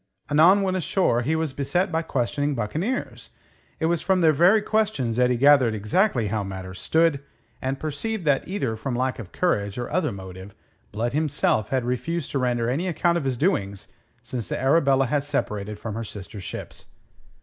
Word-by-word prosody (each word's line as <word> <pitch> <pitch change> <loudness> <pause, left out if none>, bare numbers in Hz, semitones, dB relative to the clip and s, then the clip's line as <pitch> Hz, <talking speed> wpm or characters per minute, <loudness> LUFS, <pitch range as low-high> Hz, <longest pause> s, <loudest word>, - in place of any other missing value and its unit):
Anon 175 +7 +6
when 185 -1 0
ashore 180 -8 +1
he 150 +7 0
was 160 -3 -1
beset 145 +8 0
by 160 0 0
questioning 145 0 -1
buccaneers, 160 - -3 0.5
it - - 0
was 170 0 +1
from 190 -1 +2
their 160 -2 +6
very 175 +9 +5
questions 210 - 0
that 125 0 +4
he 125 - +1
gathered 135 -4 +5
exactly 115 - +1
how 105 0 -1
matters 95 -1 -7
stood, 160 -3 +2 0.4
and 135 +1 -2
perceived 170 +6 -3
that 145 -2 +2
either 135 - -2
from 120 +3 -4
lack 130 +1 -1
of 100 -6 -8
courage 105 - 0
or 120 - -4
other 160 -1 0
motive 95 0 -9 0.4
Blood, 115 +3 -2
himself, 145 -8 +1
had 130 -2 0
refused 130 +6 -2
to 140 - 0
render 120 -2 0
any 150 +10 -1
account 170 0 +1
of 145 - -6
his 130 -2 -1
doings 100 - -1 0.3
since 120 -6 -5
the - - -2
Arabella 135 -1 +3
had 140 +3 0
separated 105 -7 -3
from 110 0 -6
her 115 +2 -4
sister 105 -1 -8
ships. - - -7
135 Hz, 185 wpm, -24 LUFS, 115-165 Hz, 0.5 s, Anon